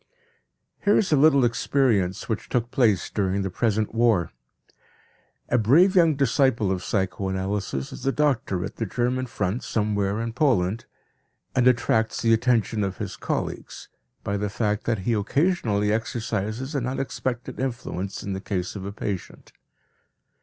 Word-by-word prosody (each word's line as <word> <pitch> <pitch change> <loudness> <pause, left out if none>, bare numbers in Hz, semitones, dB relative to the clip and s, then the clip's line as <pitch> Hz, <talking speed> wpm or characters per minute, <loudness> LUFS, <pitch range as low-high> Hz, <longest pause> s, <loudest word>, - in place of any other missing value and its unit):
Here 205 0 +4
is 195 - +1
a - - +6
little 140 -2 +5
experience 115 -6 +1
which 110 -2 -3
took 120 -1 -1
place 110 -8 +2
during 100 -1 -1
the 95 - -3
present 110 +1 0
war: 115 -7 +2 1.2
A 125 - +3
brave 165 - +5
young 165 -4 +5
disciple 130 -6 +2
of 90 -1 -2
psychoanalysis 95 -6 -2
is - - -9
a - - +4
doctor 125 -11 0
at 95 - -8
the 115 - -2
German 125 +4 -1
front 105 0 -2
somewhere 105 -1 0
in 115 0 -3
Poland, 115 -7 +1 0.7
and 125 -1 +4
attracts 115 -2 +2
the 115 0 +4
attention 115 -2 +1
of 95 -1 -3
his - - -5
colleagues - - -4 0.3
by 100 -1 -1
the 105 +1 -2
fact 105 0 -1
that 115 -1 +1
he 120 - +2
occasionally 110 - +1
exercises 115 +3 -3
an 130 -4 -1
unexpected 130 -2 -3
influence 120 -7 -4
in 100 - -3
the 95 - -4
case 95 -2 -3
of 95 -2 -6
a 100 - -4
patient. 100 -2 -6
110 Hz, 150 wpm, -25 LUFS, 100-125 Hz, 1.2 s, a